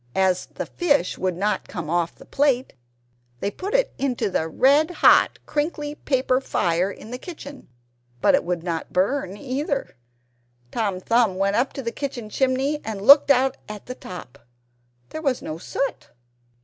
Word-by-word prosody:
As 190 -1 +2
the - - -6
fish 290 - 0
would 185 -2 -1
not 210 +3 -1
come 170 -6 -6
off 170 +1 0
the - - -15
plate, 270 -3 +1 0.7
they 200 - -2
put 395 - -4
it - - +2
into 255 -7 -1
the 160 - 0
red 280 - +4
hot 355 - +5
crinkly 295 -1 -2
paper 260 -3 0
fire 175 -6 0
in 210 +3 -10
the 250 - -5
kitchen; 285 -5 -10 0.5
but - - +4
it - - +3
would 175 -1 -2
not 165 -2 -3
burn 195 +1 0
either. 275 +3 -3 0.8
Tom 205 -5 -1
Thumb 230 0 +2
went 195 +1 +1
up 255 +4 +1
the 245 -4 -4
kitchen 240 -6 -5
chimney 270 +4 0
and 220 -3 -4
looked 280 +5 +8
out 265 -1 +3
at 210 -1 -8
the 250 - -5
top 140 - -10 0.7
there 315 - -5
was 270 -5 0
no 155 +1 -5
soot. 275 +9 -3
250 Hz, 160 wpm, -23 LUFS, 185-280 Hz, 0.8 s, looked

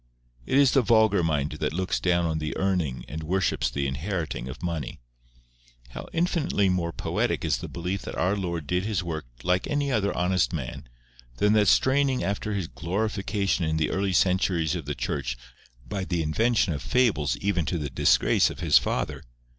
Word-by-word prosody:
It 130 - +2
is 140 -2 +6
the 135 - +4
vulgar 110 -4 +4
mind 75 -3 0
that - - -1
looks 95 +2 -1
down 85 -1 +2
on 80 -1 -1
the 75 0 -4
earning 90 -10 -1
and 80 +2 -6
worships 80 -7 0
the 70 +3 -2
inheriting 75 -1 -3
of 65 - -9
money. 85 -7 -4 0.9
How - - -8
infinitely 165 - +1
more 90 -2 0
poetic - - -1
is - - +1
the - - -6
belief 90 +3 -4
that - - -7
our 90 +4 +1
Lord 85 -5 -3
did 90 +5 0
His 100 -4 -1
work 80 -5 -5 0.2
like 90 0 +1
any 145 -1 0
other 105 -4 +1
honest 90 +1 +1
man, 70 -7 -5 0.5
than 105 0 +3
that 105 -2 +4
straining 130 +5 +3
after 100 +1 -2
His 95 -5 -2
glorification 100 +1 -1
in 80 0 0
the 80 - 0
early 95 0 0
centuries 90 -3 +2
of 85 -5 -5
the 75 - -2
Church 65 -4 -3 0.5
by 100 -2 -3
the 90 -3 -1
invention 105 +4 +1
of 70 - -4
fables 75 - +1
even 95 -1 0
to 90 - -1
the 75 -4 -4
disgrace - - +3
of - - -9
his - - +5
father! - - -2
90 Hz, 185 wpm, -26 LUFS, 80-100 Hz, 0.9 s, is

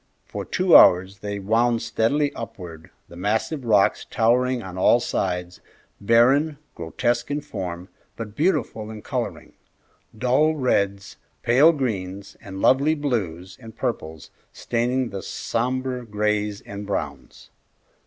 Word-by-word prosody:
For - - -6
two 185 -2 +3
hours 95 +2 +6
they 100 0 -4
wound 115 +4 +1
steadily 140 +6 0
upward, 90 -6 -9 0.2
the 85 - -13
massive 110 - -1
rocks 105 -4 +3
towering 125 +2 +1
on 95 -1 -8
all 95 +6 +4
sides, 90 -6 -3 0.4
barren, 130 +8 +3 0.2
grotesque 120 +10 -2
in 145 +1 -1
form, 90 -10 -6 0.3
but 110 -2 -7
beautiful 145 - 0
in 110 -1 -9
coloring, - - -4 0.6
dull 130 +7 +2
reds, 100 -8 -1 0.3
pale 135 +8 +6
greens, 100 - -4
and 95 -1 -8
lovely 140 +4 +4
blues 95 - -3
and 115 -1 -12
purples 80 - -4 0.2
staining 125 +1 -1
the 100 -1 -5
sombre 125 +1 -2
grays 105 -1 -1
and 100 0 -8
browns. 100 - -5
115 Hz, 125 wpm, -23 LUFS, 100-130 Hz, 0.6 s, hours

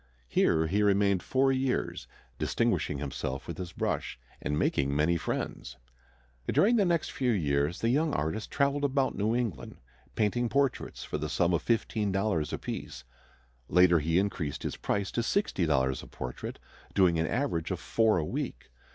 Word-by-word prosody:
Here 80 +5 +3
he 100 +6 +1
remained 100 -2 +3
four 135 +6 +2
years, 130 -1 -1 0.3
distinguishing 75 - 0
himself 70 -1 -4
with 85 0 -6
his 90 -1 -5
brush - - -2 0.2
and 75 - -1
making 70 -2 +1
many 75 +4 +3
friends. 85 - -4 0.7
During 235 +5 +4
the 205 - +4
next 170 -3 +1
few 130 -2 -1
years 75 -6 +1
the 115 - +2
young 150 +5 +2
artist 80 +9 -2
traveled 140 0 +1
about 135 -1 +1
New 110 +3 +1
England, 120 -8 -3 0.4
painting 115 +3 +1
portraits 140 -1 0
for - - -4
the - - -3
sum 85 0 +2
of 85 - +1
$15 105 -7 0
apiece. - - -5 0.7
Later 90 0 +5
he 80 +3 +1
increased 90 -7 -1
his - - -3
price 100 -1 -2
to 120 - 0
$60 80 - +1
a - - -11
portrait, 65 -1 -6 0.4
doing 90 -4 +4
an 80 - +1
average 115 - -1
of 90 -3 -2
four 110 +5 +2
a 80 - 0
week. - - -5
95 Hz, 160 wpm, -29 LUFS, 80-120 Hz, 0.7 s, Later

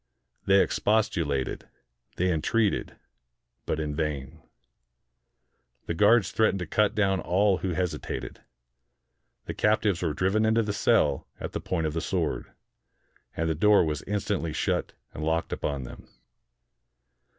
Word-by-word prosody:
They 95 0 +6
expostulated; 85 -11 0 0.5
they 90 +1 +1
entreated; 105 +6 0 0.7
but 80 - -1
in 75 -1 -3
vain. 75 -4 -3 1.4
The - - -2
guards 105 +2 +4
threatened 110 -3 +2
to 90 - -4
cut 105 +5 +1
down 95 -2 +2
all 95 +2 +2
who 95 -2 -2
hesitated. 90 0 -4 1.0
The - - -4
captives 105 -4 +1
were 80 -4 -1
driven 95 +6 +1
into 110 +1 +3
the 105 -1 -2
cell 100 - +2
at - - -5
the - - -4
point 85 -3 -2
of 75 - -1
the 80 - -2
sword, - - -2 0.9
and 80 - 0
the 80 - +1
door 105 +3 +4
was 75 -1 -2
instantly 100 -5 -1
shut - - -1 0.2
and 75 - -6
locked 80 +1 0
upon 70 -3 -3
them. - - -11
90 Hz, 135 wpm, -27 LUFS, 80-105 Hz, 1.4 s, They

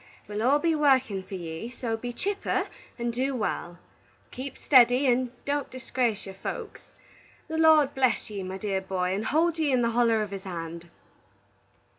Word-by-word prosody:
We'll 210 +1 -3
all 265 +5 +4
be 330 +2 +1
workin' 265 -9 +3
for 190 +1 -8
ye, 165 +4 -6
so 240 -2 -3
be 245 +2 -5
chipper 400 +11 -1 0.3
and 235 -1 -2
do 265 +3 -1
wal. 175 -6 -3 0.5
Keep 265 +2 -6
steddy, 250 0 +5
and 250 0 +2
don't 285 0 -1
disgrace 250 -4 -2
your 195 - -8
folks. 195 - -7 0.6
The 320 0 -3
Lord 310 -3 +6
bless 260 -2 +1
ye, 205 -2 -5
my 190 0 -5
dear 195 -1 -2
boy, 185 -1 -1
and 205 +3 -2
hold 325 +2 +2
ye 305 -3 +2
in 250 -2 +3
the 235 - +2
holler 230 -2 +3
of 205 - -7
his 195 -1 -5
hand!" 170 -2 -7
240 Hz, 175 wpm, -27 LUFS, 195-270 Hz, 0.6 s, Lord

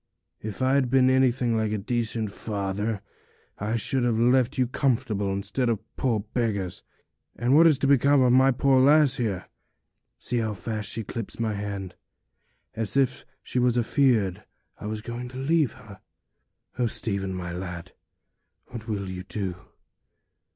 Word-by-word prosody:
If 110 +4 -4
I'd 130 -1 +3
been 130 0 +4
anything 125 -2 +2
like 110 -1 0
a 110 - 0
decent 115 0 -2
father, 100 0 -3 0.6
I 105 +3 -1
should 130 +3 0
have 120 -2 +1
left 125 +2 +3
you 130 - +3
comfortable, 115 -6 0
instead 110 +6 -1
of 115 -3 0 0.2
poor 115 -5 0
beggars. 105 -4 -2 0.5
And 120 +4 +2
what 165 +2 +8
is 155 -4 +4
to 140 - -1
become 140 +1 +5
of 125 -1 +4
my 130 +1 +6
poor 135 0 +3
lass 145 0 +5
here? 105 -7 -2 0.7
See 120 - -1
how 110 -2 -1
fast 110 0 -4
she 115 - -2
clips 115 +2 -6
my 110 -2 0
hand, 100 -3 -5 0.8
as 110 +2 -2
if 135 -2 +1 0.2
she 125 - -2
was 125 -1 +2
afeared 120 -6 +2 0.4
I - - -6
was 110 0 -4
going 120 +2 -6
to 130 - -9
leave 145 -1 +1
her! 105 -2 -14 0.8
Oh, 120 - +2
Stephen, 100 -4 -2
my 90 -1 -5
lad, 90 -1 -6 0.8
what 115 -2 -8
will 100 -3 -3
you 90 0 -5
all - - -13
do?' 95 -4 -3
115 Hz, 160 wpm, -26 LUFS, 105-130 Hz, 0.8 s, what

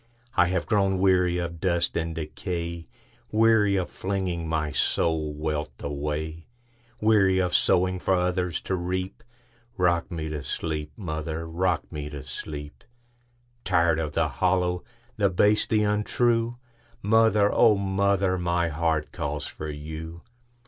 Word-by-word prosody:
I 90 - +5
have 90 0 -1
grown 100 -4 +2
weary 90 -2 +3
of 85 -1 -4
dust 85 -2 +1
and 80 -1 -2
decay,—Weary 90 +6 -1
of 95 -2 0
flinging 95 -4 -2
my 80 -2 -1
soul 80 0 +1
wealth 75 0 -3
away; 75 +3 -4 0.5
Weary 105 -4 +4
of 90 -1 +1
sowing 90 +1 +3
for 95 - +2
others 90 -1 0
to - - -3
reap;—Rock 100 +1 -3
me 80 -4 -4
to 75 -1 -4
sleep, 75 0 -3
mother,—rock 80 0 -2
me 75 -1 -5
to 75 -2 -7
sleep! 75 -1 -8 0.8
Tired 85 -1 +2
of 75 -2 -3
the - - +2
hollow, 90 -1 0 0.3
the 100 -2 +3
base, 105 +3 +3
the 110 -1 +2
untrue, 115 +3 +1 0.5
Mother, 105 -1 +4
O 115 -3 +6
mother, 100 -1 +1
my 85 -1 +1
heart 80 0 0
calls 75 -3 -3
for 75 - -6
you! 80 +3 -7
90 Hz, 130 wpm, -26 LUFS, 80-100 Hz, 0.8 s, O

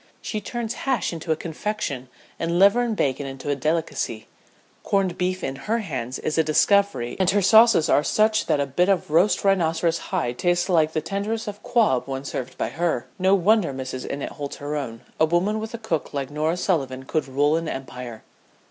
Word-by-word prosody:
She 215 -2 -4
turns 235 +1 -4
hash 265 -8 -1
into 165 0 -4
a - - +3
confection 160 -6 -4 0.3
and 170 +1 0
liver 200 +6 +5
and 235 -2 -1
bacon 140 -4 -1
into 135 +2 -4
a - - +1
delicacy. 150 -6 -2 0.6
Corned 195 -3 0
beef 185 +1 -2
in 135 - -2
her 230 - +3
hands 130 - -4
is 155 +1 -1
a - - +5
discovery 155 -5 +2
and 185 -2 +3
her 205 +1 +3
sauces 220 -3 +6
are 145 - +3
such 215 +5 +2
that - - +2
a 140 - +1
bit 175 +8 +1
of 185 -6 +1
roast 175 +6 +3
rhinoceros 170 -3 +2
hide 140 -10 -2
tastes 175 +1 +1
like 160 -3 +3
the 155 - 0
tenderest 205 +6 -3
of 205 -1 -5
squab 210 - +1
when 135 0 -4
served 130 -2 -5
by - - -1
her. 160 -6 -1
No 190 +1 +4
wonder 200 -2 +3
Mrs. 130 -1 -5
Innitt 140 - -4
holds 145 -2 -6
her 145 +1 -5
own. 115 -6 -5 0.2
A 160 - +6
woman 180 +7 +1
with 220 +1 -5
a - - -4
cook 170 -10 -3
like 140 -1 -3
Norah 155 +3 0
Sullivan 135 -8 -1
could 150 +2 -2
rule 145 +3 +2
an 165 -1 -2
empire." 125 -3 -7
165 Hz, 200 wpm, -24 LUFS, 140-200 Hz, 0.6 s, sauces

